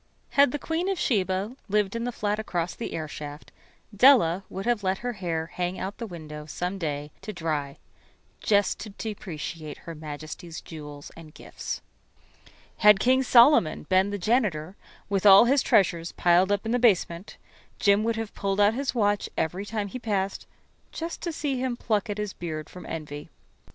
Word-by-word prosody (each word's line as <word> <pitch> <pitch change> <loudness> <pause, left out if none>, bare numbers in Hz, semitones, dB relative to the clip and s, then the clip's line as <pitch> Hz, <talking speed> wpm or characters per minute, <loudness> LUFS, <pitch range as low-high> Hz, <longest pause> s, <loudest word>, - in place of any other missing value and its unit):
Had 280 -2 +5
the 295 - -2
Queen 325 +5 -2
of 390 - -1
Sheba[13 190 - 0
1] 255 - -14
lived 210 0 +1
in 230 0 -2
the 245 - -1
flat 210 -2 -2
across 175 -5 -2
the 235 - -6
airshaft, 150 -1 -7 0.4
Della 205 -7 +6
would 195 +2 -6
have 240 -3 +1
let 190 -1 0
her 245 - -1
hair 170 -5 -3
hang 180 +1 -2
out 195 +2 -5
the 230 - -4
window 150 -4 -9
some 180 +5 -4
day 150 -3 -3
to 215 - -6
dry 155 -6 -3 0.6
just 205 -2 +2
to 215 - -7
depreciate 165 -7 -6
Her 165 - -9
Majesty's 155 +2 -8
jewels 150 -3 -10
and 160 -2 -13
gifts. - - -6 0.9
Had 210 -2 +6
King 260 +4 +4
Solomon 245 - +5
been 190 +1 +4
the 205 - -3
janitor, 195 -6 0 0.3
with 200 0 +2
all 195 +3 +9
his 270 +2 +3
treasures 170 -3 +2
piled 180 +3 +3
up 205 +1 0
in 225 - -1
the 245 - +2
basement, 190 -5 +1 0.4
Jim 200 +1 +3
would 230 0 0
have 225 -1 -5
pulled 195 0 -2
out 205 +1 +5
his 265 +2 -2
watch 205 -3 +1
every 185 +6 -2
time 210 -2 -2
he 255 +6 -6
passed, 200 -4 -2 0.4
just 330 +1 -5
to 340 - -2
see 290 -4 -2
him 255 -2 -2
pluck 215 -1 -1
at 205 - -3
his 210 -2 -3
beard 155 -3 -6
from 180 - -10
envy. 150 -2 -6
195 Hz, 180 wpm, -26 LUFS, 165-225 Hz, 0.9 s, all